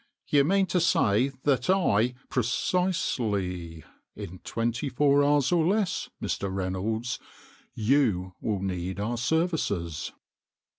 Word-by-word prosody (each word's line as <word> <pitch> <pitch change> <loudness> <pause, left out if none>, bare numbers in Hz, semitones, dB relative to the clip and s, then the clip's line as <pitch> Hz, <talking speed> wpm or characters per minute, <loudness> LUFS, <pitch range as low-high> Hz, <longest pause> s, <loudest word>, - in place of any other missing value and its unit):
" - - -53
You 145 -1 +5
mean 195 +6 +3
to 180 0 0
say 125 - +3
that 145 +4 +1
I 125 - +3
" - - -30
" - - -40
Precisely. 105 - -1 0.3
In 90 +2 -8
twenty 115 +4 -2
four 140 +2 +3
hours 145 0 +3
or 170 -2 +3
less, 195 +2 0
Mr. 100 -1 -2
Reynolds, 95 +5 -2 0.6
you 110 -7 +1
will 100 -3 -2
need 95 0 -3
our 115 +3 -2
services." 125 - -1
120 Hz, 130 wpm, -27 LUFS, 95-145 Hz, 0.6 s, You